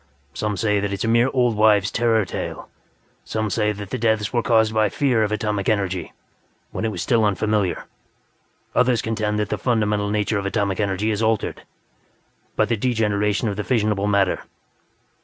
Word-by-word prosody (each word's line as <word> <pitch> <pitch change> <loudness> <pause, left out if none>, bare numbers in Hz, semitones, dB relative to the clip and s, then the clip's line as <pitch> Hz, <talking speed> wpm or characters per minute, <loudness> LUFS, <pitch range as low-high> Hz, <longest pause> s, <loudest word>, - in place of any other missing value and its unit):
Some 105 +6 -2
say 105 0 +1
that 100 0 -1
it - - -1
is - - -4
a - - 0
mere 120 +3 +3
old 125 -4 +2
wives' 105 -2 +4
terror 115 -3 +2
tale; - - -6 0.6
some 110 -1 -3
say 105 0 +1
that 100 -2 -8
the - - -2
deaths 110 -1 0
were 120 - +2
caused 110 -2 +2
by 110 -1 +2
fear 125 0 +1
of 105 -1 0
atomic 105 -3 -1
energy, 95 -4 -1 0.6
when - - -3
it 110 - 0
was 90 -4 -4
still 115 -3 +2
unfamiliar; 105 -2 0 0.9
others 125 -2 +2
contend 110 -1 -1
that 105 -1 -1
the - - -2
fundamental 105 -4 0
nature 105 0 0
of 100 - -3
atomic 100 -1 -1
energy 105 +1 0
has 105 0 -2
altered 110 -1 0 0.9
by - - +3
the 115 - 0
degeneration 105 -2 0
of 100 -2 -3
the 105 - -2
fissionable 105 -4 0
matter. 100 -2 +2
105 Hz, 180 wpm, -22 LUFS, 100-110 Hz, 0.9 s, wives